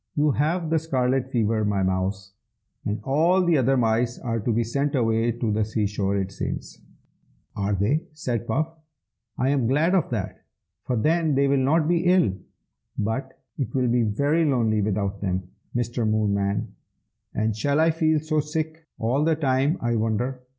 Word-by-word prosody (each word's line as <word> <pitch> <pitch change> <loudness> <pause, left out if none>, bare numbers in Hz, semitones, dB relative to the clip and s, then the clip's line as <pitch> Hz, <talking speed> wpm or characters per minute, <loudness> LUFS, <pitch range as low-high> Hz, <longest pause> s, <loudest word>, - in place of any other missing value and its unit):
"You 150 0 +3
have 160 +4 0
the 165 - +3
scarlet 130 -4 0
fever, 110 -3 +1
my 100 -2 +1
mouse, 95 +1 -2 0.5
and 105 +2 -1
all 170 +7 +3
the 170 -2 +3
other 135 -1 +3
mice 115 0 +1
are 115 -2 -2
to 115 +3 -1
be 115 +1 +1
sent 140 +5 -1
away 115 -1 +2
to 120 -1 -2
the 110 +1 +1
sea 110 0 -1
shore, 100 -1 -1
it 95 -1 -2
seems." - - -5 0.7
"Are 100 0 -1
they?" 140 - 0
said 120 -6 -3
Puff. 155 +8 -1 0.6
"I 130 - +1
am 135 -4 +1
glad 155 +8 +2
of 185 -5 +2
that, 110 -6 -4 0.4
for 125 - -1
then 155 +5 +2
they 140 +1 +3
will 140 0 +3
not 155 +3 +2
be 175 +1 +1
ill. 180 - +4 0.6
But 130 +5 -3 0.2
it 135 - -3
will 125 -2 +2
be 120 +1 +3
very 140 +10 +1
lonely 115 -7 +2
without 100 -1 -1
them, 95 -2 -2 0.2
Mr. 120 -2 0
Moonman. 100 0 0 0.7
And 110 0 0
shall 140 +7 +1
I 165 +1 +4
feel 160 -1 +2
so 155 0 0
sick 160 +2 -4
all 125 +6 +1
the 160 0 +3
time, 140 +1 +1
I 120 -1 0
wonder?" 115 +4 -1
125 Hz, 175 wpm, -24 LUFS, 110-150 Hz, 0.7 s, ill